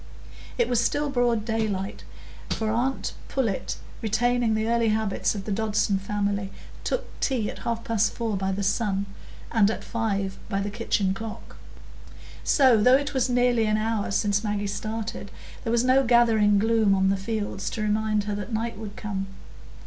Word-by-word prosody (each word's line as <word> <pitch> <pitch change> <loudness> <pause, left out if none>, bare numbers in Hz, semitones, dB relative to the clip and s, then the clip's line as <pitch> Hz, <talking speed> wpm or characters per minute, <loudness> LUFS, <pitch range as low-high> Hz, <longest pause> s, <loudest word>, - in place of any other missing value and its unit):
It 480 - +2
was 240 -1 +2
still 290 +3 0
broad 240 -4 +1
daylight, 215 -4 -2 0.5
for 220 -1 -1
aunt 250 +4 -1 0.2
Pullet, 230 -8 -1 0.2
retaining 230 +1 +1
the 220 0 0
early 230 -1 +2
habits 215 -1 0
of 195 -1 -5
the 215 - -3
Dodson 210 -1 +1
family, 200 0 -2 0.3
took - - -1
tea 240 -6 0
at - - -11
half 230 -1 -3
past 225 -2 +1
four 225 -3 -2
by 190 0 -1
the 200 +1 -2
sun, 200 -1 0 0.5
and 215 -3 +4
at 225 - -3
five 200 -4 -2
by 195 -2 0
the 200 +1 -2
kitchen 205 -3 0
clock; 220 +2 -8 0.9
so, 260 -7 +5
though 250 +4 +7
it 285 +1 -3
was 260 -1 +1
nearly 245 -2 +3
an 215 0 +2
hour 220 -1 -1
since 205 +1 +1
Maggie 205 -1 -1
started, 215 +2 -4 0.3
there 230 - -1
was 235 0 +3
no 260 +2 +4
gathering 225 -4 +4
gloom 220 -1 +3
on 190 0 +3
the 195 - +3
fields 205 -1 -3
to 215 - -3
remind 215 0 +1
her 210 0 -3
that 205 0 -4
the 230 - -3
night 230 -1 -3
would 210 -2 -7
come. 195 -2 -4
220 Hz, 175 wpm, -26 LUFS, 205-230 Hz, 0.9 s, though